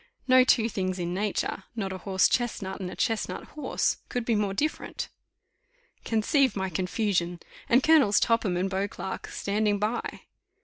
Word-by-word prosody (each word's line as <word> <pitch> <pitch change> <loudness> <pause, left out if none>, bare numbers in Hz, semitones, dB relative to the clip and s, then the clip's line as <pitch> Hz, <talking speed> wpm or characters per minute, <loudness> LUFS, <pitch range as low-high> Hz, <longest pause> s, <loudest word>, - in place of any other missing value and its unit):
No 255 0 +7
two 230 -3 +3
things 185 -4 -2
in 175 -1 -2
nature, 195 -1 -2
not 195 -4 -3
a 185 - -6
horse 190 0 +3
chestnut 205 -6 -1
and 185 -2 -4
a - - -8
chestnut 225 -1 -1
horse, 300 - -1
could 245 -3 -2
be 235 - +1
more 205 -2 +1
different. 295 +11 -2 1.0
Conceive 235 +2 +2
my 190 -1 -2
confusion! 180 -1 -1 0.3
and 250 +3 +5
Colonels 285 -11 +5
Topham 230 -6 +1
and 185 +2 0
Beauclerk 195 0 -4
standing 205 +1 0
by. 215 +4 -2
205 Hz, 150 wpm, -27 LUFS, 190-235 Hz, 1.0 s, No